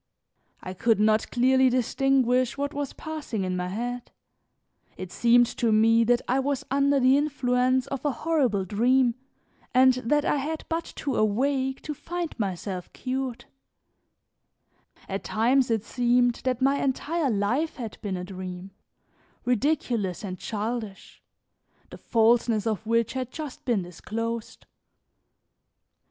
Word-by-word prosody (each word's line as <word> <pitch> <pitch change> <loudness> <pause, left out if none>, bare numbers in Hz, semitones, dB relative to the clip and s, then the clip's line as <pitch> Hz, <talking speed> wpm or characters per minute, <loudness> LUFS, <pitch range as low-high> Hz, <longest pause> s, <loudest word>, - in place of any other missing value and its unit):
I 185 - -5
could 225 +3 +2
not 215 +1 +2
clearly 260 +1 +4
distinguish 255 0 +1
what 285 +1 -2
was 285 -1 -3
passing 300 -10 -5
in 185 0 -2
my 180 0 -2
head; 240 +5 -4 0.9
it 185 -1 -7
seemed 240 +1 +4
to 230 -2 +2
me 225 +2 +5
that 245 +1 +2
I 260 +2 +2
was 275 0 -1
under 280 0 +3
the 260 +1 +5
influence 255 -3 +1
of 275 -2 -5
a 295 - +2
horrible 255 -8 0
dream 240 +5 +2 0.6
and 260 0 +6
that 255 +4 0
I - - +2
had 310 +3 -4
but 330 0 -1
to 275 -4 -3
awake 265 +5 0
to 305 - -4
find 345 +3 -5
myself 190 -2 -4
cured; 260 -2 -4 1.6
at 195 0 -4
times 250 +4 +2
it 225 -3 0
seemed 245 0 +1
that 255 0 0
my 275 +1 +2
entire 290 +3 0
life 240 +9 0
had 230 -5 -7
been 195 -3 -3
a 180 - -5
dream, 185 0 -7 0.7
ridiculous 245 - 0
and 185 -3 -5
childish, 220 -2 -5 0.7
the - - -10
falseness 230 -1 +2
of 220 -1 -2
which 230 0 +1
had 260 -2 -3
just 295 0 -8
been 230 -7 +1
disclosed. 225 +6 -5
245 Hz, 135 wpm, -26 LUFS, 215-270 Hz, 1.6 s, and